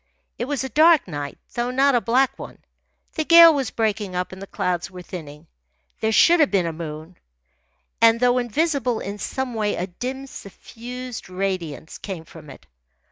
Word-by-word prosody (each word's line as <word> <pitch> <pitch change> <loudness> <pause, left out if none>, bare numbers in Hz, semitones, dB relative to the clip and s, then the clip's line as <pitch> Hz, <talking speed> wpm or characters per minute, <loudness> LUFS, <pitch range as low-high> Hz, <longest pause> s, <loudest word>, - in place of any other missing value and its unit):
It 240 - -1
was 280 0 -2
a 265 - -4
dark 315 +2 +5
night, 145 -4 -6 0.2
though 240 +1 -1
not 270 +2 +3
a 240 - +3
black 255 +3 +1
one. - - -9 0.6
The 315 - -1
gale 335 0 +8
was 275 -5 -1
breaking 210 -4 -2
up, 180 0 -2
and 190 0 -10
the 195 - -8
clouds 180 -1 -2
were 180 -1 -10
thinning. 155 -4 -9 0.5
There 220 - 0
should 340 +10 +5
have 300 - +4
been 190 -4 +1
a 165 - -3
moon, 160 +1 -8 0.8
and, 230 0 +5
though 250 0 +3
invisible, 250 -1 0
in 200 +1 -6
some 265 +2 -4
way 210 -2 -1
a 180 - -2
dim, 255 +9 -6
suffused 245 +1 -9
radiance 185 -5 -4
came 180 -5 -7
from 155 -3 -14
it. 135 - -13
220 Hz, 180 wpm, -22 LUFS, 180-260 Hz, 0.8 s, gale